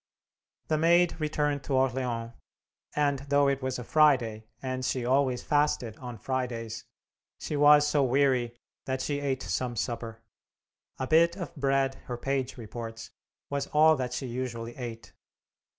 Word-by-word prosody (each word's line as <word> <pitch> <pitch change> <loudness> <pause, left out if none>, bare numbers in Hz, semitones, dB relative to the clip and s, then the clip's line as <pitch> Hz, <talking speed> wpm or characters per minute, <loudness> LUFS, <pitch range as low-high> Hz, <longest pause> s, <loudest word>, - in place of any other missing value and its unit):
The 155 -1 +2
Maid 170 +1 +4
returned 150 -2 0
to 135 - 0
Orleans, 125 -3 0 0.6
and, 145 -2 +1
though 145 0 +4
it 140 0 0
was 130 -1 -2
a 125 - -6
Friday, 120 -7 +3
and 130 -1 -4
she 125 -1 -1
always 130 -1 +2
fasted 145 -6 +1
on 125 -2 -8
Fridays, 120 -2 -3 0.5
she 150 - -4
was 145 0 +7
so 150 -1 +2
weary 130 -2 +2 0.3
that 130 0 -2
she 145 0 -1
ate 135 -2 -2
some 125 -2 -2
supper. 115 +3 -4 0.7
A 130 - -2
bit 165 +4 +4
of 175 - -6
bread, 135 -1 +1
her 120 - -4
page 135 +1 -2
reports, 115 0 -7 0.4
was 140 -1 -1
all 155 +1 +5
that 125 -1 -3
she 125 +1 -3
usually 120 -2 -5
ate. 115 -3 -7
130 Hz, 150 wpm, -28 LUFS, 120-145 Hz, 0.7 s, was